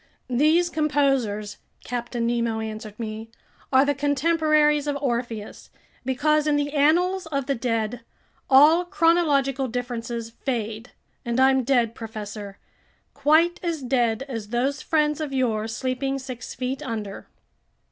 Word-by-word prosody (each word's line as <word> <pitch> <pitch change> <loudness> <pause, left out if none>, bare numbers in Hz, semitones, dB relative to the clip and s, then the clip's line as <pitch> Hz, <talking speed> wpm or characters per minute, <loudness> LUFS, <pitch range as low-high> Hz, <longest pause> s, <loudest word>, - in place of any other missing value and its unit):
"These 315 +7 +3
composers," 270 -9 0 0.3
Captain 240 -1 -3
Nemo 235 -1 0
answered 215 -1 -6
me, 220 0 -5 0.4
"are 265 +1 +5
the 285 - +2
contemporaries 300 +1 +2
of 285 -1 0
Orpheus, 235 -5 -4 0.3
because 300 +4 +1
in 300 - +3
the 290 0 -1
annals 345 +5 +2
of 280 -4 -2
the 275 - 0
dead, 230 -1 -2 0.5
all 300 +6 +7
chronological 315 -7 +2
differences 235 -1 -4
fade; 225 -2 -4 0.3
and 235 +1 -1
I'm 265 0 +4
dead, 240 -3 +2
professor, 210 -3 -7 0.6
quite 315 +5 +3
as 330 -5 -3
dead 245 -2 +1
as 230 -6 -6
those 255 +5 -1
friends 300 -1 +1
of 295 -3 -4
yours 225 -4 0
sleeping 270 +1 -2
six 255 -2 -7
feet 260 +3 -3
under!" 220 -7 -5
260 Hz, 125 wpm, -24 LUFS, 230-295 Hz, 0.6 s, all